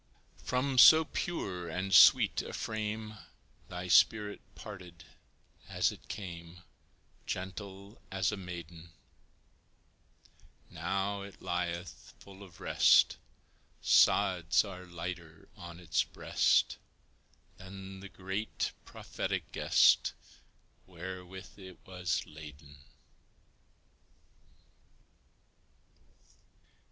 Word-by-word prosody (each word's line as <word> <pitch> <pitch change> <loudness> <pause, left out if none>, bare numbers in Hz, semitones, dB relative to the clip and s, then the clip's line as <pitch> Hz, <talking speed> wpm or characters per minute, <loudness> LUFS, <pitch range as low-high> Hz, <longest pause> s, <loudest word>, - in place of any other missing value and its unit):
From 130 +1 0
so 160 +5 +9
pure 90 - -4
and 95 +4 -3
sweet - - +7
a - - -8
frame 110 0 -4 0.5
Thy 90 +1 -6
spirit 105 +3 +3
parted 90 -5 -11 0.7
as - - +1
it - - -14
came, 85 -2 -8 0.6
Gentle 100 +2 -7
as 95 -2 0
a - - -3
maiden; 85 -3 -9 1.8
Now 95 +4 -2
it 100 0 -11
lieth 85 -1 -4
full 100 0 -14
of 90 -4 -14
rest - - +4 0.6
Sods 85 0 +4
are 90 -2 -9
lighter 85 -2 -7
on 85 -1 -10
its 85 -2 +1
breast - - +1 0.8
Than 95 +1 -10
the 100 +1 -10
great, 95 +3 -3
prophetic - - -5
guest - - +4 0.7
Wherewith 95 +2 -9
it 95 -2 -11
was 90 -3 -2
laden. 75 -2 -12
95 Hz, 85 wpm, -31 LUFS, 85-100 Hz, 1.8 s, so